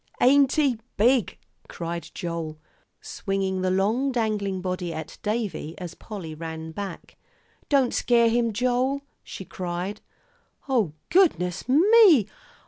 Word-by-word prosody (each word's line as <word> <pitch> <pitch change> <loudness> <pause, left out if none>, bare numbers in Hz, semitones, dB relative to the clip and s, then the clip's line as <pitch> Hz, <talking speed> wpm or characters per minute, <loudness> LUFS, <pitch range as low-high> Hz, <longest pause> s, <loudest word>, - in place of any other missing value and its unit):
"Ain't 275 +1 +5
he 275 -7 +2 0.2
big?" 240 +1 +3 0.3
cried 170 0 -5
Joel, 165 -3 -4 0.4
swinging 195 -1 -2
the 185 - +1
long 215 +9 +1
dangling 210 -5 -1
body 180 -1 -3
at 160 -2 -7
Davie 210 -7 -3
as 175 -2 -7
Polly 185 -7 -8
ran 160 0 -6
back. 200 +4 -7 0.5
"Don't 275 -4 +3
scare 235 -1 +3
him, 230 0 +1
Joel," 255 +4 0 0.2
she 190 - -8
cried. 180 +3 -5 0.7
"O 230 - +1 0.2
goodness 240 - +2
me! 345 - +6
205 Hz, 120 wpm, -25 LUFS, 180-255 Hz, 0.7 s, me